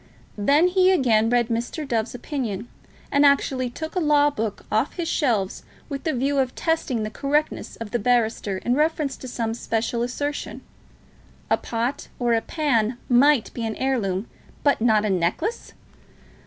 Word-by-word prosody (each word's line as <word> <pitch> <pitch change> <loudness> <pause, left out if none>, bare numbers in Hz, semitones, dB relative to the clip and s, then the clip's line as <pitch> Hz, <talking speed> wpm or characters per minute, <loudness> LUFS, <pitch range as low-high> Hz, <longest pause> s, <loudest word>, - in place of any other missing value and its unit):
Then 285 - +4
he 370 0 +4
again 230 -11 +3
read 240 -1 +2
Mr. 240 +6 -3
Dove's 230 -1 -1
opinion, 240 -5 -4 0.4
and 285 +1 +4
actually 270 -3 +3
took 315 +6 -6
a - - +2
law 295 -2 +4
book 225 -6 -4
off - - +1
his 345 -2 -3
shelves 225 - 0 0.3
with 280 +2 -5
the 315 - +1
view 275 +3 0
of 260 -1 0
testing 300 -8 0
the 215 - -4
correctness 295 +5 -1
of 225 -2 -8
the 240 - 0
barrister 225 -4 +1
in 240 +6 -1
reference 300 -1 +1
to 260 - -9
some 230 -2 -2
special 230 0 -2
assertion. 285 +4 -3 0.9
A - - +5
pot 235 +4 -3
or 240 -1 +1
a 225 - +2
pan 240 -7 0
might 260 0 +4
be 235 - -4
an 220 -1 -2
heirloom, 225 -7 -1 0.4
but 285 -5 +3
not 220 -2 +3
a - - 0
necklace! 185 - -1
245 Hz, 165 wpm, -24 LUFS, 225-290 Hz, 0.9 s, A